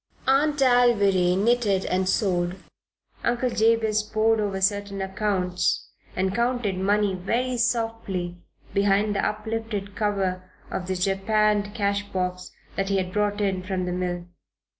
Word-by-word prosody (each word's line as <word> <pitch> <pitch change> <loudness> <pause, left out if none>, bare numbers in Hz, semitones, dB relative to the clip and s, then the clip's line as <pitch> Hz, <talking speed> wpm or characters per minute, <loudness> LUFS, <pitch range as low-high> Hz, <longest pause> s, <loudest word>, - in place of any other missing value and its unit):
Aunt 290 +3 +3
Alviry 205 -8 +4
knitted 210 -2 +2
and 185 0 0
sewed; 180 -3 0 0.7
Uncle 240 +1 +1
Jabez 225 -1 +2
pored 215 +1 +1
over 200 -2 -1
certain 200 0 0
accounts 190 -2 -1 0.2
and 190 +1 0
counted 235 -4 0
money 200 +1 +1
very 235 +8 -1
softly 225 -7 -1 0.3
behind 200 +1 +2
the 195 - 0
uplifted 215 -2 -3
cover 190 -3 -1 0.2
of 180 - -3
the 190 - -1
japanned 205 +2 +1
cash 200 -1 +1
box 180 -1 -3 0.3
that 195 0 0
he 195 - +2
had 185 -1 -2
brought 210 0 0
in 190 -2 0
from 185 0 -2
the 180 - -2
mill. 180 -1 -2
200 Hz, 135 wpm, -25 LUFS, 185-220 Hz, 0.7 s, Alviry